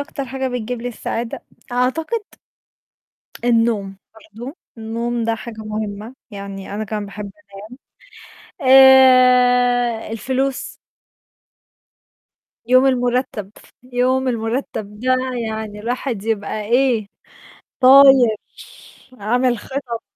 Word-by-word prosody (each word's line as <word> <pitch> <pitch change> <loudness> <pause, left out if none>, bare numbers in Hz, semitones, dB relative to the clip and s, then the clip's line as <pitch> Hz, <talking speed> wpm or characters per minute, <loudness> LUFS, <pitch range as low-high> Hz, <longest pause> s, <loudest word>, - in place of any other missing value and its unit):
أكتر 285 -1 -5
حاجة 265 +1 -4
بتجيب 245 -1 -4
لي 245 - -3
السعادة؟ 235 0 -5 0.3
أعتقد 315 - -1 1.2
النوم، 225 -5 +1 0.2
برضه. 225 - -11 0.2
النوم 230 +1 -3
ده 230 0 0
حاجة 225 0 -9
مهمة، 215 +1 -6 0.2
يعني 200 -1 -8
أنا 215 +1 -3
كمان 210 0 -4
باحب 200 0 -8 1.3
أنام. 260 - 0
آآ، 250 -3 +5
الفلوس 260 +4 -2 1.9
يوم 255 +3 +4
المُرتّب، 245 -5 -1 0.4
يوم 255 +1 +1
المُرتّب 225 -3 -4
ده 255 +1 +2 0.3
يعني 220 -1 -6
الواحد 240 -1 -3
يبقى 215 -1 -2
إيه؟ 240 -1 +1 0.7
طاير، 265 -3 +7 0.8
عامل 245 +4 +1
خطط. 250 0 -6
240 Hz, 90 wpm, -19 LUFS, 220-255 Hz, 1.9 s, طاير